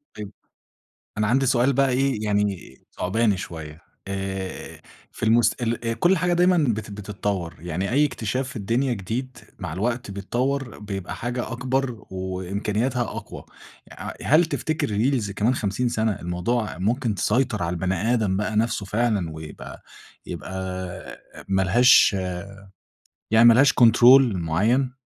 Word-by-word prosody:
طيب، 105 -2 -7 0.9
أنا 110 - +1
عندي 135 +5 +2
سؤال 130 +1 +3
بَقى 135 0 +3
إيه 130 -3 0
يعني 100 -9 -1 0.2
ثعباني 105 +1 +1
شوية، 80 -3 -8 0.3
آآ 95 -1 -5 0.3
في - - -10
المس 115 +1 +4
ال 115 0 -2
كلّ 180 +5 +4
حاجة 175 +1 +1
دايمًا 180 +1 +4
بت 115 -9 0
بتتطوّر، 100 -4 -4
يعني 90 +3 -3
أي 145 +4 +4
اكتشاف 125 0 -3
في - - -11
الدنيا 120 +5 0
جديد 120 +6 -5 0.2
مع - - -5
الوقت 115 +4 -2
بيتطوّر 120 +6 -2
بيبقى 100 -3 -5
حاجة 120 +1 -4
أكبر، 125 0 -2
وإمكانياتها 100 +6 -2
أقوى، 120 - -6 0.5
ع - - -7
هل 160 +4 +4
تفتكر 155 -2 -2
الreels 110 0 0
كمان 110 +6 +1
50 110 +3 -1
سنة، 110 -1 0
الموضوع 90 +4 -2
ممكن 115 +3 0
تسيطر 110 -1 0
على 85 - -1
البني 95 +6 0
آدم 105 -5 +1
بَقى 105 +1 -2
نفْسه 110 -1 0
فعلًا، 105 -5 0
ويبقى 80 -1 -9 0.4
يبقى 95 - -7 0.9
ما 95 0 +1
لهاش 110 +3 +5 1.2
يعني 115 +1 +7
ما 115 - +9
لهاش 135 +4 +5
control 120 +3 +7
معيّن؟ 105 +11 +1
110 Hz, 135 wpm, -24 LUFS, 95-125 Hz, 1.2 s, ما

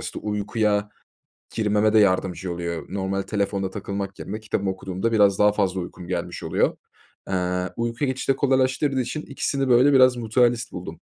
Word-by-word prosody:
işte - - -5
uykuya 105 0 0 0.7
girmeme 105 -1 +2
de 110 - +5
yardımcı 95 -3 +1
oluyor. 85 -1 -4
Normal 95 0 -2
telefonda 100 -2 -2
takılmak 100 0 -5
yerine 105 +3 -6
kitabımı 105 -2 -2
okuduğumda 95 +4 -3
biraz 100 -3 +4
daha 105 0 +5
fazla 95 -3 0
uykum 90 0 -8
gelmiş 90 - -4
oluyor. - - +1 0.5
Eee, 90 -1 -1
uykuya 115 +4 -1
geçişi 130 +1 0
de - - -6
kolaylaştırdığı 135 +1 +1
için 125 +5 -3
ikisini 140 -1 -2
böyle 125 +4 +5
biraz 130 -2 +6
mutualist 120 +1 +1
buldum. 90 - -8
105 Hz, 155 wpm, -24 LUFS, 95-120 Hz, 0.7 s, biraz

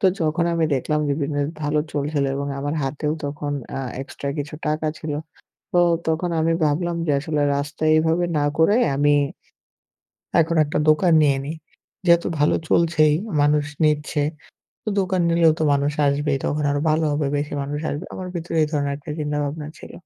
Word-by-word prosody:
তো 190 - +4 0.2
যখন 160 +2 +1
আমি 165 -1 +2
দেখলাম 150 +4 0
যে 140 - +1
বিজনেস 145 0 -1
ভালো 150 +1 +1
চলছিল 145 0 -1
এবং 140 0 -3
আমার 145 +2 -2
হাতেও 150 +2 -2
তখন 145 0 -4 0.2
অ্যাঁ 135 -2 -4
এক্সট্রা 140 0 -7
কিছু 145 +1 -4
টাকা 155 +1 -1
ছিল। 155 -2 -4 0.6
তো 175 - +4 0.3
তখন 160 +2 0
আমি 165 +1 +2
ভাবলাম 170 +3 0
যে 145 - +2
আসলে 150 -1 -1
রাস্তায় 145 +2 0
এভাবে 165 +2 +2
না 145 - +1
করে, 180 +6 +5 0.2
আমি 145 +1 +4 1.3
এখন 165 +1 0
একটা 145 - -2
দোকান 165 +2 +4
নিয়ে 140 -2 +3
নি। 150 - -3 0.5
যেহেতু 170 0 +4
ভালো 150 - +3
চলছেই 160 -3 +4 0.3
মানুষ 145 0 +3 0.2
নিচ্ছে। 150 0 +1 0.6
তো - - -3
দোকান 185 -1 0
নিলেও 165 -1 +5
তো - - -1
মানুষ 140 +1 +1
আসবেই। 140 0 +1
তখন 150 0 -1
আরো 145 0 0
ভালো 155 +1 +2
হবে 145 -1 0
বেশি 145 +1 -3
মানুষ 145 +2 -4
আসবে। 145 +4 -5
আমার 185 -1 -6
ভিতরে 165 -1 -4
এই - - +2
ধরনের 145 -2 0
একটা 150 +1 -10
চিন্তা 150 -1 -2
ভাবনা 150 +1 -4
ছিল। - - -11
150 Hz, 175 wpm, -22 LUFS, 145-160 Hz, 1.3 s, করে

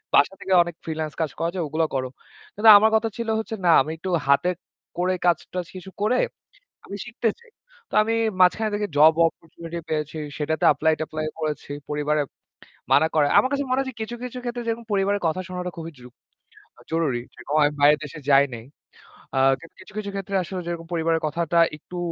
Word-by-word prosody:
বাসা 145 - +5
থেকে 190 - -1
অনেক 175 -1 -7
ফ্রিল্যান্স 155 -2 -4
কাজ 155 -4 -1
করা 165 +1 0
যায় 175 - -1
ওগুলো 160 +2 0
করো।" 130 -1 -1 0.5
কিন্তু 220 +1 +5
আমার 220 +2 +4
কথা 225 +1 +1
ছিল 235 - -4
হচ্ছে 220 0 -4
না 170 - +6
আমি 155 - -3
একটু 185 +3 -5 0.2
হাতে 140 +6 +3 0.5
করে 180 +1 +1
কাজ-টাজ 175 +1 0
কিছু 185 +1 -9
করে 220 +4 +2 0.7
আমি 200 - -7
শিখতে 235 -1 -1
চাই। 470 -1 -21 0.4
তো - - -23
আমি 225 +1 0 0.3
মাঝখানে 215 +4 +4
থেকে 205 0 -2
জব 155 +2 +7
অপরচুনিটি 165 +1 -8
পেয়েছি। 155 0 -2 0.2
সেটাতে 155 +1 -2
এপ্লাই-ট্যাপ্লাই 155 0 -1
করেছি। 150 -2 -4 0.2
পরিবারে 150 0 0 0.7
মানা 160 - +5
করে। 150 -2 +4
আমার 260 - +4
কাছে 280 0 0
মনে 255 +1 +1
হচ্ছে 260 -3 -5
কিছু, 240 +2 -4
কিছু 250 0 -6
ক্ষেত্রে 240 0 -4
যেরকম 230 +1 -2
পরিবারের 200 +1 +1
কথা 165 +3 -1
শোনাটা 180 0 -4
খুবই 165 0 -6
জু 125 - -12 0.8
জরুরি। 155 -7 0
যে - - -19 0.2
আমি 145 0 +4
বাইরের 145 +1 +5
দেশে 150 +1 -8
যাই 140 0 +6
নাই। 115 0 -8 0.7
আ - - +3 0.2
কিন্তু 165 - -15
কিছু, 185 - -14
কিছু 205 -1 -4
ক্ষেত্রে 195 0 -5
আসলে 185 +1 -5
যেরকম 170 -1 -5
পরিবারের 165 -1 +1
কথাটা 170 +2 0 0.2
একটু 180 +4 -10
170 Hz, 185 wpm, -24 LUFS, 155-205 Hz, 0.8 s, জব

